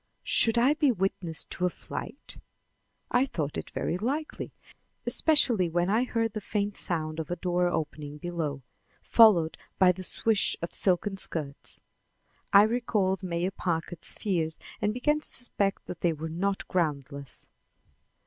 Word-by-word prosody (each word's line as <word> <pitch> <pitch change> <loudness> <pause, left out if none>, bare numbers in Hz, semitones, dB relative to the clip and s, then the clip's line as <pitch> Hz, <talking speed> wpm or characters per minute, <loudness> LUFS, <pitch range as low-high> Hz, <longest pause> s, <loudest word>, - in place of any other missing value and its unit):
Should 225 0 +4
I 255 +5 +5
be 300 -3 +3
witness 185 -5 -1
to 180 - -3
a - - 0
flight? - - -8 0.7
I 245 - +4
thought 150 - -3
it - - -5
very 175 - -2
likely, 285 +8 -3 0.5
especially 240 - +3
when 175 +3 +1
I 230 +4 +3
heard 225 -3 -1
the 215 - -4
faint 205 0 -2
sound 155 -2 -2
of 160 - -4
a 175 - -1
door 180 0 +1
opening 150 -3 -3
below, 155 -4 -3 0.4
followed 190 -9 +5 0.2
by 185 -1 +6
the 185 +1 -7
swish 215 +3 +1
of 170 - -5
silken 195 +1 +2
skirts. 150 -6 -1 0.7
I 200 - +8
recalled 215 -4 +1
Mayor 180 0 -1
Packard's 170 -2 -1
fears 165 -6 -1 0.2
and 210 - +2
began 295 +6 +1
to - - -8
suspect 200 -5 -1
that 175 - -7
they 170 -2 +2
were 160 +1 -5
not 195 +4 -2
groundless. 140 -5 -2
185 Hz, 150 wpm, -28 LUFS, 165-215 Hz, 0.7 s, I